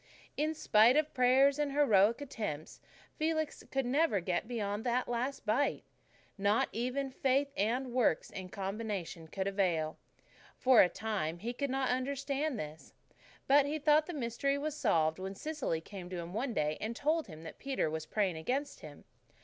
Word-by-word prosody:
In 310 +2 0
spite 235 -2 +5
of 305 0 +1
prayers 265 +3 +4
and 290 -2 0
heroic 230 -4 +4
attempts, 210 - -5 0.4
Felix 315 -1 -1
could 270 -1 -1
never 275 -3 +2
get 180 +3 -2
beyond 210 -3 -2
that 250 0 0
last 245 +3 -2
bite. 245 +7 +1 0.6
Not 200 +2 +2
even 255 +4 -2
faith 275 +2 +1
and 240 +5 0
works 245 -10 +1
in 185 -1 -7
combination 195 -4 -4
could 190 +4 -3
avail. 175 -6 0 0.6
For 255 -2 +6
a 180 - +5
time 190 -5 -3
he 230 +7 -4
could 280 +3 -2
not 265 0 0
understand 275 +2 -1
this. 155 -2 -8 0.5
But 285 +1 +5
he 300 +2 -1
thought 305 +1 +3
the 355 - -5
mystery 275 +2 -1
was 300 +1 -3
solved 165 - +1
when 190 +1 -5
Cecily 290 - -3
came 180 0 -9
to 180 - -5
him 170 +1 -6
one 235 +2 -2
day 150 0 0
and 225 +2 -3
told 310 +4 0
him 160 -3 -11
that 160 - -10
Peter 270 -10 -1
was 155 0 -4
praying 195 -6 0
against 270 - -2
him. 150 -2 -11
235 Hz, 170 wpm, -33 LUFS, 190-280 Hz, 0.6 s, For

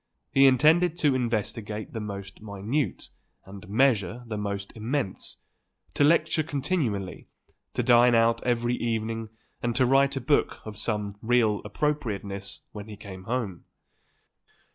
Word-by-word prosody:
He 135 0 +6
intended 155 +6 +4
to 145 -3 +4
investigate 110 -3 -2
the 115 - -3
most 100 -2 -7
minute 110 +7 -3 0.4
and 95 -1 -11
measure 115 -1 +2
the 115 -2 -5
most 100 -1 -4
immense, 115 -2 -3 0.5
to - - +2
lecture 155 +1 +4
continually, 140 - -2 0.5
to - - +1
dine 120 0 +6
out 115 0 +3
every 120 -1 +1
evening 115 -1 -2 0.3
and 120 -1 -1
to 130 - +4
write 135 +2 +3
a - - -1
book 145 +4 +1
of 110 -1 -7
some 105 -1 -2
real 110 -3 +2
appropriateness 100 -6 -3
when 105 0 -8
he 105 -2 -9
came 95 -3 -10
home. 110 -7 -3
115 Hz, 135 wpm, -27 LUFS, 105-130 Hz, 0.5 s, He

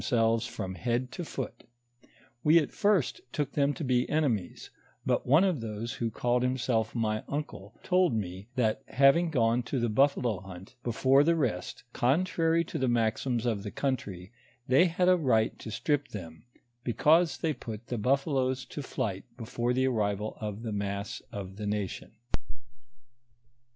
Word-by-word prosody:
135 120 - +1
selves 115 +1 +2
from 95 -1 -5
bend 125 +1 0
to 175 - -5
foot; 135 -5 -6 0.8
we 155 +2 +6
at 155 - +2
first 205 - +1
took 145 -2 -2
them 140 -1 +2
to 150 - -5
be 125 -2 +2
eneniios, 125 - -1 0.3
but - - 0
one 150 +8 +6
of 180 -10 +1
those 110 +1 -4
who 115 - -2
called 120 +2 0
himself 125 -3 0
my 110 -2 0
uncle, 130 -8 -5
told 180 -2 +3
me, 95 -1 -4
that 110 -4 +1
having 135 +7 +4
gone 120 -4 +2
to 125 +2 -2
the 120 0 +1
buffalo 125 -3 +2
hunt 95 +2 -11
before 130 +4 +3
the 170 +2 +3
rest, 115 - -2
contrary 165 +4 +2
to - - -5
the 130 - +1
maxims 120 +1 0
of 110 -4 0
the 105 - -5
country, 100 -9 -3 0.4
they 135 +8 +6
had 180 +1 +1
a 185 - +7
right 125 -10 +1
to - - -7
strip 145 +6 0
tliein, 85 -6 -8 0.4
because 160 - +3
they 160 -2 0
put 110 -4 -8
the 120 - -3
buffaloes 130 +1 +1
to 145 - -6
flight 110 -8 -3
before 120 +1 -2
the 130 +1 +2
arrival 105 -4 0
of 105 +1 -4
the 115 - -3
mass 100 0 -3
of 95 -1 -7
the 105 -1 -4
nation. 105 -2 -3
120 Hz, 165 wpm, -29 LUFS, 110-140 Hz, 0.8 s, a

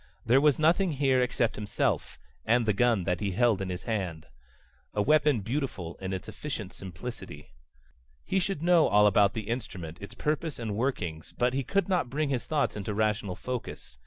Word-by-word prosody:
There 125 +4 +5
was 150 -2 +4
nothing 170 +3 +3
here 135 -2 +2
except 125 -2 0
himself 105 -1 -1 0.3
and 120 +1 +3
the 105 - +2
gun 115 -2 +2
that 90 +1 -1
he 100 -3 -2
held 115 -1 +3
in 95 - -3
his 90 0 -5
hand. 90 -8 -3 0.7
A 105 - +2
weapon 150 -3 +3
beautiful 110 - -3
in 95 0 -3
its 95 -1 -4
efficient 110 -10 -6
simplicity. 90 - -8 0.7
He 190 - +1
should 185 -4 -2
know 175 -2 +5
all 105 +1 +5
about 100 0 +4
the 110 -2 -4
instrument, 95 -9 -5
its 100 - -9
purpose 155 0 -2
and 110 -4 -3
workings, 90 - -3
but 125 +1 +2
he 135 +1 0
could 200 +9 0
not 180 -10 +1
bring 150 +2 -1
his 130 -3 -2
thoughts 150 -3 0
into 105 0 -4
rational 105 -2 0
focus. 120 - -6
115 Hz, 185 wpm, -28 LUFS, 100-140 Hz, 0.7 s, There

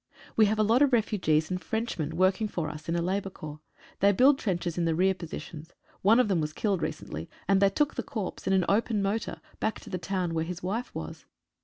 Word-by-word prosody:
We 215 -1 +6
have 215 +2 +1
a 215 - +3
lot 230 +5 +3
of 285 -3 +4
refugees 180 -8 +2
and 180 0 -2
French 225 -4 -2
men 160 +1 -2
working 190 +4 +3
for 170 -6 -3
us 155 +2 -9
in 170 - +1
a 170 - 0
Labour 195 +2 -1
Corps. 155 -4 -9 0.4
They 200 +1 +5
build 265 +7 +5
trenches 175 -4 -1
in 175 - 0
the 165 -1 +1
rear 190 +3 +3
positions. 165 -2 -8 0.3
One 220 +5 +5
of 250 - +4
them 185 -5 +1
was 150 0 -3
killed 195 -3 0
recently, 80 +2 -5 0.2
and 195 0 +4
they 200 - +6
took 295 +8 +1
the - - -2
corpse 225 -10 -5
in 190 - +3
an 185 -2 +3
open 210 0 +1
motor 210 +3 -2 0.2
back 220 - -1
to - - -11
the 185 - -2
town 180 -2 -2
where 160 -1 0
his 175 +1 -6
wife 220 +7 -3
was. 80 0 -7
190 Hz, 235 wpm, -28 LUFS, 170-215 Hz, 0.4 s, We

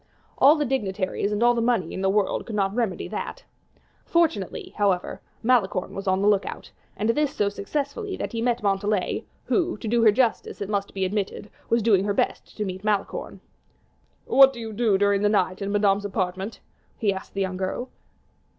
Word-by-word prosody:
All 285 +3 +7
the 300 -2 0
dignities 200 -6 -1
and 210 +2 0
all 240 0 +5
the 235 - 0
money 230 -8 +1
in 190 - -4
the 195 - +2
world 200 0 0
could 225 - -5
not 195 -1 +1
remedy 225 -5 -1
that. - - -5 0.6
Fortunately, 315 - 0
however, 195 -4 0 0.2
Malicorne 220 -6 +1
was 195 +1 -6
on 190 +1 +2
the - - +3
lookout, 205 -1 0 0.3
and 215 +2 0
this 295 +3 0
so 205 -1 +1
successfully 285 - -4
that - - -4
he 230 - -3
met 240 -2 0
Montalais, 200 0 0 0.2
who, 350 -2 0
to 225 - -6
do 235 +2 +2
her 220 -2 +7
justice, 235 +1 0
it 200 - -4
must 200 -1 -2
be 190 -1 0
admitted, 205 +1 -3 0.2
was 230 -1 +2
doing 200 -4 +4
her 205 -1 0
best - - -2
to 210 - -1
meet 190 0 -5
Malicorne. 210 -2 -2 0.8
"What 270 0 +7
do 240 - -9
you 225 -1 -6
do 215 -2 +2
during 200 0 +2
the 205 - +3
night 190 -2 +1
in 200 0 -2
Madame's 205 -1 +2
apartment?" 190 +1 -3 0.4
he 205 -4 +1
asked 190 - -9
the 195 - -1
young 185 -1 -2
girl. 190 +7 -3
205 Hz, 195 wpm, -25 LUFS, 195-235 Hz, 0.8 s, All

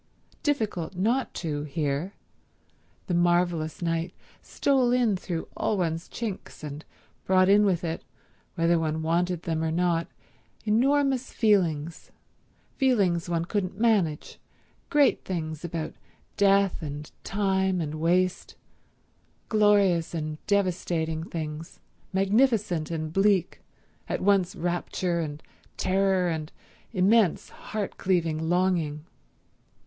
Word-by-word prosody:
Difficult 215 - -1
not 230 +9 +1
to, 150 -4 -3
here; 150 +4 -2 0.9
the 180 - -2
marvelous 175 -2 +1
night 165 +1 -1 0.3
stole 265 -3 +1
in 245 -5 +3
through 175 -3 -4
all 215 - 0
one's 165 -2 -2
chinks, 215 -8 -6
and 150 +1 -6 0.4
brought 185 0 +4
in 205 +2 +6
with 180 -4 +1
it, 165 -1 -3 0.5
whether 170 -1 +3
one 160 0 -1
wanted 175 +1 0
them 160 -2 -1
or 160 - 0
not, 170 0 +1 0.6
enormous 265 +4 +2
feelings—feelings 180 - -1
one 170 -1 0
couldn't 190 0 -2
manage, 200 -10 +1 0.5
great 290 -2 +3
things 160 -4 -4
about 165 -2 -4 0.4
death 200 -2 +3
and 150 -1 -6
time 190 -2 0
and 155 -3 -3
waste; 175 +3 0 0.9
glorious 200 -6 +3
and 155 -1 -4
devastating 175 -5 0
things, 160 -1 -6 0.3
magnificent 200 - +2
and 155 -1 -4
bleak, 195 -2 +2 0.5
at - - -1
once 190 -2 +2
rapture 175 0 -1
and 150 -2 -5 0.3
terror 190 -1 +2
and 160 -2 -3 0.4
immense, 200 -1 +3
heart 215 -2 -5
cleaving 165 -3 0
longing. 170 -4 0
175 Hz, 110 wpm, -27 LUFS, 160-200 Hz, 0.9 s, in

